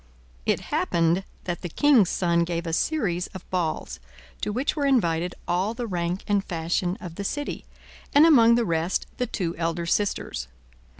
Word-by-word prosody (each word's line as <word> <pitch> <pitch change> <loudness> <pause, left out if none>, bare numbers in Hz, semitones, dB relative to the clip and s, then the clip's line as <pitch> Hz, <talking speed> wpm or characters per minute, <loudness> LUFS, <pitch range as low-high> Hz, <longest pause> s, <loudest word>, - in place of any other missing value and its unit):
It - - +2
happened 170 +2 +2 0.2
that 175 -1 -4
the 175 - -4
king's 250 - +4
son 170 -2 +2
gave 170 0 -3
a 165 - -3
series 180 - 0
of 190 - -9
balls, 175 - -2 0.4
to - - -1
which 255 +7 -1
were 290 -2 +1
invited 175 -9 +1
all 185 +6 0
the 240 - -3
rank 180 -2 -2
and 205 -2 +1
fashion 175 +2 -1
of 170 -4 -9
the 200 - -3
city, 290 +8 -3 0.5
and 290 +3 +7
among 235 -8 +7
the 235 -1 +2
rest 165 +1 0
the 250 - -1
two 175 -7 -3
elder 165 0 -1
sisters. 170 - -1
180 Hz, 170 wpm, -25 LUFS, 170-230 Hz, 0.5 s, and